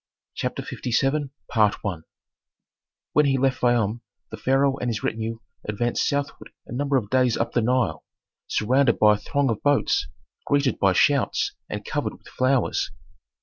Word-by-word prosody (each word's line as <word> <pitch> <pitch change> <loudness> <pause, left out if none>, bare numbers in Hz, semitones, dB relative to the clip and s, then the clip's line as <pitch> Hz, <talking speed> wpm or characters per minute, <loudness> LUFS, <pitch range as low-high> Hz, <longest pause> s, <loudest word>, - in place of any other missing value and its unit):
CHAPTER - - -3
LVII 135 +4 -1 1.8
When 150 - +4
he 135 -1 +2
left 135 0 +1
Fayum 120 -2 +2 0.3
the - - -6
pharaoh 135 +1 +2
and 125 - -1
his 110 -3 -3
retinue 115 +1 -2 0.3
advanced 120 +3 0
southward 140 0 -3 0.2
a - - -14
number 140 +2 +1
of 105 -5 -3
days 125 -2 +3
up 115 - -1
the 120 - +1
Nile, 115 -9 0 0.4
surrounded 125 +3 +2
by 105 -1 +6
a - - -1
throng 140 -3 0
of 110 - -3
boats, 145 - +2 0.4
greeted 140 -2 +1
by 95 -1 +4
shouts, 140 +7 +2 0.2
and - - -5
covered - - -2
with - - -17
flowers. 130 -1 +1
125 Hz, 145 wpm, -24 LUFS, 115-140 Hz, 1.8 s, by